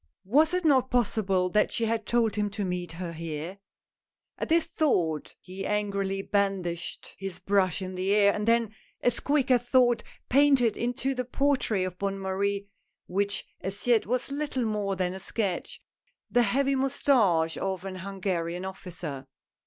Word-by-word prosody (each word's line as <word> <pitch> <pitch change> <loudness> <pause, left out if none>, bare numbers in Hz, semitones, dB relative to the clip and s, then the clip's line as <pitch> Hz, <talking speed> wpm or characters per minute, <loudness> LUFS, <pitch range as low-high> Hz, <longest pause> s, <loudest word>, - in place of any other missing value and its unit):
Was 310 - +4
it 365 -2 -1
not 260 -4 +4
possible 200 -6 +1
that 210 +3 +2
she 230 - 0
had 225 -1 -1
told 230 -3 +2
him 210 -1 0
to 205 0 -3
meet 180 -2 -3
her 170 0 -5
here. 165 +3 -5 0.8
At - - -3
this 330 0 +4
thought 175 - 0
he 190 +1 -8
angrily 200 -1 -1
brandished 195 -5 -2
his 195 -2 -5
brush 195 -2 +1
in 185 0 -5
the 185 +1 -1
air, 200 -1 +5
and 210 +1 -3
then, 230 -2 +3 0.3
as 245 - +2
quick 280 -2 +1
as 245 -1 +2
thought, 245 -2 +4 0.3
painted 270 -4 +4
into 245 +3 -1
the 250 -1 -2
portrait 250 -6 +1
of 180 -1 -6
Bonne 195 0 -1
Marie 200 +1 -1 0.2
— - - -55
which 200 0 0 0.2
as 195 +2 -5
yet 235 -3 +3
was 250 +3 -1
little 280 -4 -1
more 205 -3 -1
than 185 -1 -1
a 190 - -6
sketch 195 -1 -3 0.3
— - - -44
the 245 - +4
heavy 270 +5 +2
moustache 230 - +2
of 190 -1 -3
an 190 -1 -5
Hungarian 185 -2 -3
officer. 170 -8 -7
200 Hz, 170 wpm, -28 LUFS, 185-245 Hz, 0.8 s, air